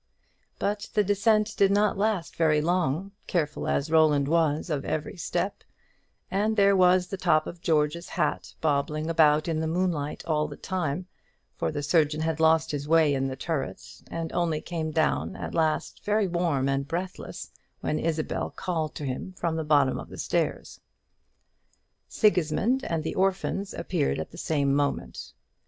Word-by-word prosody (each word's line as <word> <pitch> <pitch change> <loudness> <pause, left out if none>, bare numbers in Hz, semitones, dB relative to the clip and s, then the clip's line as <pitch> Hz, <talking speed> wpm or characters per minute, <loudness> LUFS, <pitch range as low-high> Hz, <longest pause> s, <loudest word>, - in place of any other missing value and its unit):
But 205 +1 -2
the 210 - +4
descent 210 +2 +2
did 195 - +5
not 205 +1 +3
last 200 -4 -1
very 155 -2 +3
long, 175 +2 0 0.2
careful 150 -4 -1
as 145 +3 0
Roland 150 -3 +4
was 160 0 +1
of 140 -2 -1
every 155 -1 -3
step; 175 - -3 0.7
and 215 +3 +1
there 200 -1 +5
was 180 -1 +5
the 195 +2 -5
top 155 -4 +2
of 170 0 -8
George's 160 0 0
hat - - -2
bobbing 155 +1 0
about 155 -1 +4
in 160 -2 0
the 160 - -1
moonlight 165 -4 -1
all 150 -2 +1
the - - -9
time; 180 -2 -2 0.5
for 80 - -1
the 145 - -4
surgeon 150 0 +2
had 160 -1 -1
lost 160 0 +3
his 145 -1 -4
way 160 -2 +4
in 135 0 0
the 130 - -4
turret, 140 0 -5
and 165 -1 -4
only 170 -3 0
came 160 -1 -4
down 160 +4 0
at - - -6
last 160 -2 0
very 210 -1 +2
warm 170 -6 0
and 135 0 0
breathless 180 +4 -5 0.3
when 155 - -1
Isabel 160 -1 -1
called 160 -4 -3
to 145 - -5
him 135 +8 -4
from 165 -1 -1
the 160 - -1
bottom 145 -3 +3
of - - -9
the - - -10
stairs. - - -2 1.3
Sigismund 210 +6 +2
and 165 -2 -1
the - - -3
orphans 195 +1 0
appeared 70 0 -1
at 80 - -5
the 170 - -12
same 140 -4 +1
moment. 140 - -2
160 Hz, 165 wpm, -27 LUFS, 150-185 Hz, 1.3 s, did